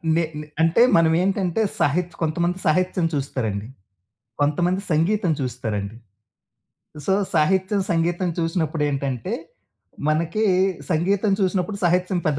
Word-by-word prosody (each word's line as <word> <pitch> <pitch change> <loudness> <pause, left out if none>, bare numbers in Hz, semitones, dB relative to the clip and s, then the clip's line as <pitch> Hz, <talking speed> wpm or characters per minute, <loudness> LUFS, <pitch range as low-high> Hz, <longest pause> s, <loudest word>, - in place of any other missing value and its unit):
నే 170 - +2 0.2
నే 150 - -7 0.2
అంటే, 165 +8 +4 0.2
మనమేంటంటే, 180 +4 +2 0.2
సహిత్ 175 +4 +1
కొంతమంది 170 +3 0
సాహిత్యం 180 +2 +2
చూస్తారండి. 115 -7 -2 0.7
కొంతమంది 175 +6 +1
సంగీతం 175 +3 +2
చూస్తారండి. 110 -5 -3 1.1
సో, - - +2 0.2
సాహిత్యం, 190 +5 +2
సంగీతం 175 +2 0
చూసినప్పుడేంటంటే, 150 - -1 0.7
మనకీ 165 +8 +1 0.5
సంగీతం 195 +5 +1
చూసినప్పుడు 190 +1 0
సాహిత్యం 180 +2 +2
పెద్ద 145 -2 +1
170 Hz, 95 wpm, -22 LUFS, 150-185 Hz, 1.1 s, అంటే